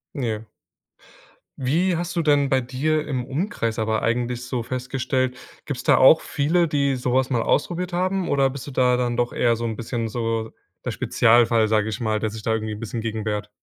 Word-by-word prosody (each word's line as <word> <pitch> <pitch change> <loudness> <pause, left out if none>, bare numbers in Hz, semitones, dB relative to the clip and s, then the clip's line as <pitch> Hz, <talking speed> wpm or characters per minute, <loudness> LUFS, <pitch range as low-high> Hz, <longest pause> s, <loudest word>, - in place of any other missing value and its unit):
Ja. 115 -6 -3 1.1
Wie 165 +8 +1
hast 175 +1 -3
du - - +3
denn 145 -3 +3
bei 135 -1 +3
dir 145 +5 -1
im 130 -4 -2
Umkreis 135 - -2
aber 110 0 0
eigentlich 120 +1 -1
so 125 -1 -3
festgestellt 130 +1 -2 0.3
gibt 145 -4 -4
es - - -7
da - - +6
auch 160 +5 +7
viele, 165 +4 +1
die 140 -3 +1
sowas 125 +1 +1
mal 120 -3 +1
ausprobiert 175 +3 0
haben? 185 +1 0
Oder 135 -1 +2
bist 135 +1 -8
du - - -6
da 125 -1 +3
dann 120 -1 -1
doch 120 0 0
eher 120 -1 +2
so 115 - -5
'n 110 -2 -3
bisschen 115 -1 -3
so 115 -1 -2 0.3
der - - -2
Spezialfall, 115 -1 +3
sage 110 -1 +2
ich 110 +3 -4
mal, 110 -2 0
der 110 - -1
sich 110 +1 -8
da 110 - +1
irgendwie 110 -1 -2
'n 105 - -7
bisschen 115 +1 -4
gegen 110 -1 -3
wehrt? 105 -1 -3
125 Hz, 205 wpm, -23 LUFS, 115-140 Hz, 1.1 s, auch